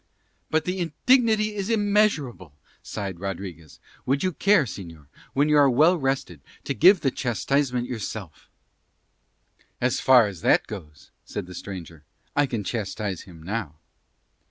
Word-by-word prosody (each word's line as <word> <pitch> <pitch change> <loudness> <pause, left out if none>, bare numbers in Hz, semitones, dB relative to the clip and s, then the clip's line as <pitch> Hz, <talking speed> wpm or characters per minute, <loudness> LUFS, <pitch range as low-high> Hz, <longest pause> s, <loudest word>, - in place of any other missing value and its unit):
"But 160 0 +1
the 185 +1 -2
indignity 215 - +2
is 200 0 -4
immeasurable," 205 - +1 0.3
sighed 95 -5 -5
Rodriguez. 90 -5 -7 0.3
"Would 135 +5 +1
you 185 - +1
care, 195 0 +3
señor, 85 - -9 0.3
when 145 +2 +2
you 150 -1 +4
are 140 -1 +6
well 155 +8 +5
rested 135 - -2 0.2
to 140 - -2
give 180 +7 +6
the 135 - +1
chastisement 125 +2 -1
yourself?" 105 -7 -7 1.3
"As 125 -1 +1
far 125 -3 +6
as 100 -5 -6
that - - +3
goes," 75 -8 -10
said 105 - -6
the 90 - -11
stranger, 85 -5 -8 0.3
"I 145 -1 +3
can 115 -5 -3
chastise 100 -3 -3
him 85 -4 -14
now." 95 -5 -4
125 Hz, 140 wpm, -25 LUFS, 95-155 Hz, 1.3 s, are